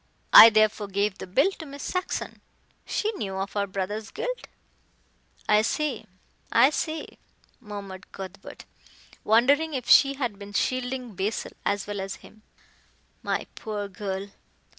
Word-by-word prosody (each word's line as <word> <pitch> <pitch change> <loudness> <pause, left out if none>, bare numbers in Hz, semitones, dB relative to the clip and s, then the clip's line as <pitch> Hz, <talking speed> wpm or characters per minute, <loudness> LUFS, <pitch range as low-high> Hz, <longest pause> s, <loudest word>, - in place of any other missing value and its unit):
I 225 - +12
therefore 215 -1 +2
gave 200 0 -1
the - - -7
bill 275 - +3
to 320 - -7
Miss 280 0 -9
Saxon. 365 0 -3 0.5
She 435 - -1
knew 200 - -5
of 195 +1 -4
her 200 -1 -1
brother's 205 +3 -4
guilt - - -5 0.5
" - - -34
"I 210 - +5
see 275 +2 -2 0.4
I 270 - +6
see," 315 +1 -4 0.4
murmured 200 -4 -9
Cuthbert, 190 -1 -10 0.6
wondering 280 +8 +3
if 250 -2 -4
she 275 0 +6
had 240 -7 -3
been 200 0 -10
shielding 255 +1 -2
Basil 195 +4 -3 0.2
as 200 -1 0
well 205 -1 -4
as 195 0 -5
him. 215 - -17 0.8
"My - - -2
poor 210 -2 -5
girl!" 195 0 -5
215 Hz, 140 wpm, -26 LUFS, 200-270 Hz, 0.8 s, I